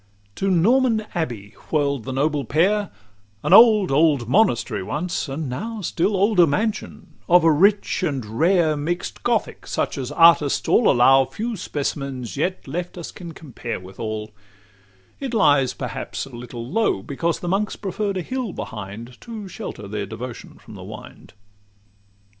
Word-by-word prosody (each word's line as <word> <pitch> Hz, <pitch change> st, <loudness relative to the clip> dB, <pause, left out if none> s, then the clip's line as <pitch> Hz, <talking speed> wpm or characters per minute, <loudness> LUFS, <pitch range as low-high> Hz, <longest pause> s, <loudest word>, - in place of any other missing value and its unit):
LV -, -, -37 dB
To 195 Hz, -, 0 dB
Norman 220 Hz, +5 st, +3 dB
Abbey 120 Hz, -, -4 dB, 0.2 s
whirl'd 140 Hz, -5 st, 0 dB
the 130 Hz, -, -4 dB
noble 145 Hz, +2 st, 0 dB
pair, 195 Hz, -, +1 dB, 0.5 s
An -, -, +2 dB
old, 215 Hz, -6 st, +7 dB
old 140 Hz, -4 st, +3 dB
monastery 120 Hz, -, +2 dB
once, 155 Hz, -, -3 dB
and 145 Hz, +2 st, -4 dB
now 215 Hz, -, -5 dB
Still 190 Hz, +3 st, 0 dB
older 195 Hz, -3 st, +4 dB
mansion; 215 Hz, +9 st, -3 dB, 0.2 s
of 175 Hz, -1 st, +6 dB
a 165 Hz, -, +5 dB
rich 200 Hz, +7 st, +2 dB
and 140 Hz, -9 st, -2 dB
rare 170 Hz, -2 st, +3 dB
Mix'd 165 Hz, +4 st, -4 dB
Gothic, 235 Hz, -3 st, -1 dB
such -, -, -2 dB
as 130 Hz, +1 st, -4 dB
artists 165 Hz, -2 st, +4 dB
all 240 Hz, -, +4 dB
allow 135 Hz, +1 st, +5 dB
Few 220 Hz, -, -4 dB
specimens 140 Hz, -, -4 dB
yet 180 Hz, +5 st, -2 dB
left 175 Hz, +6 st, -5 dB
us 170 Hz, -, -7 dB
can 170 Hz, -2 st, -9 dB
compare 125 Hz, -6 st, -6 dB
Withal: 105 Hz, +3 st, -6 dB, 0.9 s
it 265 Hz, -4 st, -4 dB
lies 145 Hz, -, +3 dB
perhaps -, -, -5 dB
a 135 Hz, -3 st, -12 dB
little 120 Hz, -1 st, -7 dB
low, 200 Hz, -, 0 dB
Because 165 Hz, +7 st, -2 dB
the 175 Hz, -, -6 dB
monks 200 Hz, +4 st, 0 dB
preferr'd 200 Hz, 0 st, -3 dB
a 180 Hz, -, -2 dB
hill 255 Hz, -1 st, -4 dB
behind, 110 Hz, +3 st, -8 dB
To 220 Hz, -4 st, -8 dB
shelter 105 Hz, -, -7 dB
their 100 Hz, -1 st, -4 dB
devotion 115 Hz, +3 st, -8 dB
from -, -, -14 dB
the -, -, -10 dB
wind. -, -, -11 dB
160 Hz, 155 wpm, -22 LUFS, 130-195 Hz, 0.9 s, old